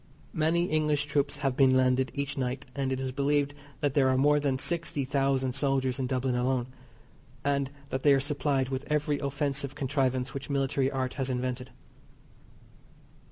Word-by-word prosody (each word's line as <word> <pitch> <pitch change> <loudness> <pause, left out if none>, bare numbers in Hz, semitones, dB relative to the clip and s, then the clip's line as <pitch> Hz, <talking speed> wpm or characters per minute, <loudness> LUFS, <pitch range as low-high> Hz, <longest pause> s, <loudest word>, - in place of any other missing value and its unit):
Many 165 +1 +2
English 150 -3 +1
troops 145 -1 0
have 135 -2 +1
been 130 -1 +5
landed 130 0 +2
each 140 0 -2
night, 130 -1 -2
and 135 -1 -1
it 130 - -1
is 130 -1 -2
believed 145 +1 +1 0.3
that 145 -2 +1
there 135 -2 +4
are 130 - +2
more 145 +2 +4
than 140 -2 0
sixty 165 -2 -1
thousand 135 -1 +1
soldiers 135 -1 0
in 130 - 0
Dublin 130 0 0
alone, 125 0 +1 0.8
and 140 -1 +1 0.2
that 130 - -2
they 145 -1 +6
are - - +2
supplied 140 -1 0
with 135 +3 -4
every 150 -1 +1
offensive 140 -1 -2
contrivance 130 -2 0
which 140 +1 -6
military 135 -1 +1
art 130 -2 -2
has 135 - -1
invented. 125 0 -2
135 Hz, 165 wpm, -29 LUFS, 130-145 Hz, 0.8 s, they